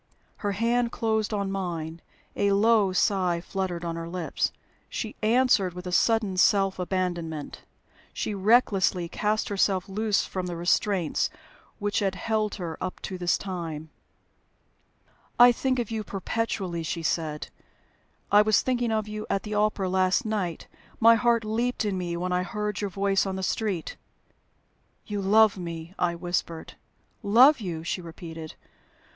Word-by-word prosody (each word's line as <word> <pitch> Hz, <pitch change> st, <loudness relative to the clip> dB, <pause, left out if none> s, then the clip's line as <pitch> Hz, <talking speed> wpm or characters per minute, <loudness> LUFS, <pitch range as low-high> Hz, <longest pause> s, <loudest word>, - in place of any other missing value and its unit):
Her 205 Hz, -1 st, -2 dB
hand 235 Hz, +3 st, +1 dB
closed 220 Hz, -2 st, 0 dB
on 200 Hz, -2 st, -1 dB
mine, 170 Hz, -4 st, -4 dB, 0.3 s
a 200 Hz, 0 st, +2 dB
low 210 Hz, -1 st, +4 dB
sigh 185 Hz, -2 st, +1 dB
fluttered 180 Hz, -1 st, -4 dB
on 165 Hz, -1 st, -3 dB
her 165 Hz, 0 st, -5 dB
lips. 175 Hz, -2 st, -2 dB, 0.4 s
She 220 Hz, -, -4 dB
answered 220 Hz, -5 st, +3 dB
with 180 Hz, 0 st, -8 dB
a 180 Hz, -, -4 dB
sudden 210 Hz, 0 st, +2 dB
self 195 Hz, 0 st, +3 dB
abandonment; 175 Hz, -4 st, -3 dB, 0.5 s
she 215 Hz, -, -3 dB
recklessly 195 Hz, -4 st, +3 dB
cast 210 Hz, +5 st, -1 dB
herself 195 Hz, -1 st, +1 dB
loose 210 Hz, +1 st, 0 dB
from 185 Hz, -1 st, -4 dB
the 175 Hz, -, -4 dB
restraints 175 Hz, 0 st, +1 dB, 0.5 s
which 205 Hz, 0 st, -1 dB
had 195 Hz, -2 st, 0 dB
held 215 Hz, +2 st, -1 dB
her 170 Hz, -5 st, -6 dB
up 185 Hz, -, -4 dB
to 185 Hz, -1 st, -5 dB
this 175 Hz, -1 st, +2 dB
time. 165 Hz, -5 st, -6 dB, 1.5 s
"I 245 Hz, 0 st, +9 dB
think 255 Hz, +2 st, 0 dB
of 235 Hz, -3 st, -2 dB
you 220 Hz, -1 st, -2 dB
perpetually," 195 Hz, -3 st, -3 dB
she 165 Hz, +1 st, -4 dB
said. 155 Hz, -2 st, -2 dB, 0.8 s
"I 205 Hz, +1 st, +7 dB
was 215 Hz, 0 st, +3 dB
thinking 245 Hz, -2 st, 0 dB
of 215 Hz, -1 st, 0 dB
you 215 Hz, 0 st, -6 dB
at 195 Hz, -, 0 dB
the 215 Hz, -, -5 dB
opera 210 Hz, -2 st, +1 dB
last 185 Hz, +6 st, +2 dB
night. 200 Hz, -6 st, -2 dB, 0.3 s
My 230 Hz, 0 st, +8 dB
heart 230 Hz, -1 st, +2 dB
leaped 235 Hz, +2 st, -1 dB
in 205 Hz, -2 st, -1 dB
me 175 Hz, -2 st, -3 dB
when 180 Hz, +1 st, -2 dB
I 180 Hz, 0 st, +2 dB
heard 210 Hz, +3 st, -3 dB
your 205 Hz, -, -1 dB
voice 195 Hz, +1 st, +1 dB
in 190 Hz, -, -3 dB
the 190 Hz, -, -4 dB
street." 195 Hz, -4 st, -2 dB, 1.1 s
"You 205 Hz, -1 st, -3 dB
love 210 Hz, +1 st, +5 dB
me!" 170 Hz, 0 st, -6 dB
I 175 Hz, -1 st, +1 dB
whispered. 170 Hz, -1 st, -3 dB, 0.5 s
"Love 250 Hz, +7 st, +6 dB
you!" 170 Hz, -5 st, -4 dB
she 180 Hz, -, -3 dB
repeated. 165 Hz, -1 st, -9 dB
195 Hz, 150 wpm, -26 LUFS, 175-215 Hz, 1.5 s, I